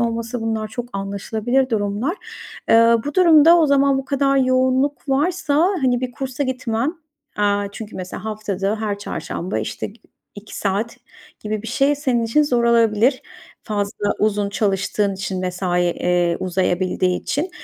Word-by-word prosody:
olması 230 +1 -2
bunlar 220 -1 -2
çok 240 +2 -6
anlaşılabilir 220 +6 -1
durumlar. 215 - -1 0.5
Eee, 230 +1 +6
bu 290 - -4
durumda, 335 -2 +7
o 320 - +4
zaman 275 -1 +3
bu 270 - -4
kadar 275 0 +1
yoğunluk 260 +1 +1
varsa, 300 +2 +1 0.3
hani, 250 -2 +2
bir 255 -1 -3
kursa 265 +3 -4
gitmen, 255 +2 -2 0.4
eee, 205 -1 +1
çünkü 215 0 -8
mesela, 185 +2 -7
haftada 210 -1 -2
her 205 -2 -2
çarşamba, 170 - -4
işte, 110 - -4
gi 210 +3 -15 0.3
2 205 +1 -10
saat 205 +4 -2 0.4
gibi 215 0 -3
bir - - -8
şey 275 +4 +2
senin 255 -5 0
için 265 +7 +3
zor 245 -5 +1
olabilir, 235 +2 +3 0.4
fazla 205 -1 -2
uzun 210 -1 +1
çalıştığın 200 0 0
için, 190 -1 -4
mesai, 180 -1 -1
eee, 175 0 +1
uzayabildiği 185 0 0
için. 320 +7 -2
225 Hz, 145 wpm, -20 LUFS, 200-260 Hz, 0.5 s, durumda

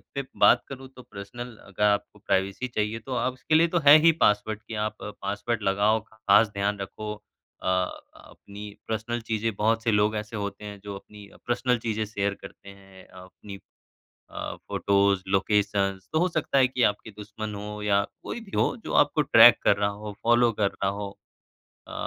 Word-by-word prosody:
पे 140 - -1 0.2
बात - - +6
करूँ 135 -1 -9
तो 125 - -11
पर्सनल 115 +3 -9
अगर 100 +1 -4
आपको 105 0 +1
प्राइवेसी 100 +4 -1
चाहिए, 110 -1 -2
तो 130 +3 -7
अब 125 +1 0
उसके 130 +5 -1
लिए 165 +2 +5
तो 175 - -1
है 150 +2 +11
ही 165 +1 +6
पासवर्ड 105 +1 +2
कि 115 - -7
आप 110 - -4
पासवर्ड 105 +2 -4
लगाओ, 100 +3 +2
खास 110 0 +3
ध्यान 100 0 -1
रखो। 105 +2 -6 0.5
अ, - - -3 0.5
अपनी 100 +1 -12 0.2
पर्सनल 115 +2 -3
चीज़ें 115 0 -2
बहुत 110 +2 +1
से 115 - +2
लोग 105 +1 +2
ऐसे 105 +1 -5
होते 100 0 -5
हैं 100 -1 -8
जो 100 -1 -6
अपनी 105 +1 -13
अ, - - -19
पर्सनल 125 +1 +1
चीज़ें 110 -1 -2
शेयर 100 -1 -2
करते 100 - -12
हैं, 95 -1 -16
अपनी 95 +2 -12 0.7
अ, - - -6
फ़ोटोज़, 100 -1 +1
लोकेशन्स 100 0 0
तो 155 - +2
हो 180 - +3
सकता 155 -4 -1
है 130 -1 +5
कि 125 -1 -1
आपके 105 +1 0
दुश्मन 105 +1 -7
हों 105 +1 -7
या 100 -1 +2 0.2
कोई - - -5
भी 210 -3 -14
हो, - - +1
जो - - -5
आपको 145 +1 +3
ट्रैक 120 -4 +8
कर - - +4
रहा 100 0 +1
हो, 105 +1 -7
फ़ॉलो 120 0 +4
कर 100 - +3
रहा 100 - -2
हो 100 -1 -6 0.7
अ, - - -10
105 Hz, 190 wpm, -26 LUFS, 100-115 Hz, 0.7 s, है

